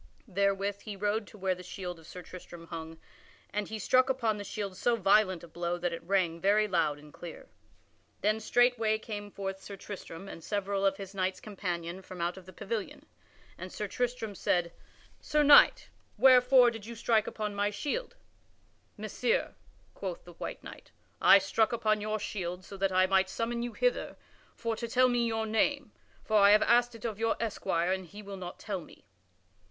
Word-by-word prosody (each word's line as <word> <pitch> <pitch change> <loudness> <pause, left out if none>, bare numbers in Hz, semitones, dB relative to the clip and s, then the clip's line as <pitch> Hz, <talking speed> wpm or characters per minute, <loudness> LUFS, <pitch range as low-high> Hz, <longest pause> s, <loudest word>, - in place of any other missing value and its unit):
Therewith 200 0 0
he 210 -2 -7
rode 210 +2 -1
to - - -14
where 190 -1 0
the 180 - -9
shield 180 -1 -6
of 160 - -16
Sir 180 - -9
Tristram 175 -2 -11
hung, 165 -1 -7 0.6
and 210 0 -1
he 220 - -5
struck 255 +5 +3
upon 230 -5 +1
the 205 - -5
shield 200 -1 -5
so 240 +5 +2
violent 195 -4 +3
a - - -9
blow 175 +1 -3
that 175 -1 -2
it 170 - -5
rang 170 -2 0
very 210 +2 +4
loud 165 -6 +1
and 150 0 -15
clear. 175 - -10 0.7
Then 215 +1 +2
straightway 230 -1 +3
came 205 -2 -6
forth 195 -1 -5
Sir 200 - -8
Tristram 195 -2 -9
and 165 - -9
several 200 -1 0
of 195 - 0
his 195 -1 -8
knights 190 -1 -1
companion 180 -3 -4
from 185 -1 -10
out 170 +1 -1
of 190 -2 -13
the - - -10
pavilion, 210 +2 -5 0.5
and 185 0 -7
Sir 210 - -4
Tristram 240 -1 -2
said, 175 -3 0 0.5
"Sir 300 0 +1
Knight, 290 0 +7 0.3
wherefore 250 -1 +7
did 225 -2 -8
you 235 - -7
strike 225 -1 +2
upon 210 -1 -3
my 205 0 +1
shield?" 295 - -3 0.8
"Messire," - - -1 0.4
quoth 185 -3 -5
the 175 - -13
white - - -7
knight, - - -11 0.3
"I - - +9
struck 200 +3 +1
upon 215 -2 +1
your 215 +1 -1
shield 180 -3 -4
so 200 - -9
that 195 0 +1
I 185 0 +4
might 190 0 +3
summon 235 +3 -2
you 240 -1 -4
hither - - 0 0.4
for 230 -1 -2
to 235 - -4
tell 255 +2 +4
me 240 -1 +1
your 225 -1 -1
name, 225 +6 0 0.3
for 215 - +2
I 200 0 +7
have 210 - +5
asked 240 0 +3
it 230 - -9
of 220 -3 -3
your 225 0 +1
esquire 185 -6 -1
and 190 -1 -2
he 205 +5 -11
will 200 0 -7
not 180 -1 -7
tell 195 -4 -4
me." - - -16
200 Hz, 190 wpm, -30 LUFS, 185-225 Hz, 0.8 s, I